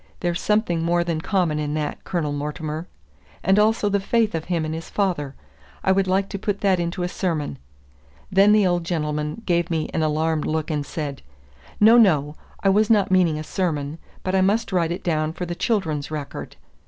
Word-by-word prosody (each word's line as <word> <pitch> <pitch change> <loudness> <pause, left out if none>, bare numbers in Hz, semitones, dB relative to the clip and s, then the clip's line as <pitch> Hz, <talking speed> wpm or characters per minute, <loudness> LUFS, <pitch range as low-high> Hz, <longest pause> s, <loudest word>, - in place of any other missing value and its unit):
There's 175 0 -1
something 210 -6 +1
more 170 +1 +2
than 165 -2 -2
common 175 -5 0
in 150 0 -2
that, 150 -1 -3
Colonel 165 -5 -1
Mortimer. 150 +3 -4 0.6
And 195 +3 +4
also 215 0 +3
the 200 0 +2
faith 220 +2 +1
of 160 -1 -3
him 170 -3 -1
in 155 - -3
his 160 0 -6
father! 170 -9 -1 0.5
I 190 - +3
would 190 0 +2
like 190 +1 +1
to 195 - -5
put 205 -1 -2
that 190 -3 +3
into 175 +1 -2
a - - 0
sermon." 165 - -2 0.7
Then 195 +2 +5
the 210 -1 +5
old 175 -1 +1
gentleman 150 +2 -2
gave 170 -2 +1
me 160 -2 -2
an 160 - 0
alarmed 155 0 0
look, 160 +1 -1
and 150 -2 -1
said, 145 -2 -5 0.6
"No, 225 +3 +7
no; 150 -9 +4 0.3
I 195 - +4
was 210 +2 +3
not 210 -4 +3
meaning 175 -4 +3
a 155 - -4
sermon; 155 -4 -2 0.2
but 185 - -2
I 190 - +3
must 205 +3 +1
write 170 -3 +1
it 180 +3 -4
down 155 -2 0
for 180 +1 -4
the 175 - -4
'Children's 165 -8 -1
Record. 150 -2 -6
170 Hz, 200 wpm, -23 LUFS, 155-195 Hz, 0.7 s, No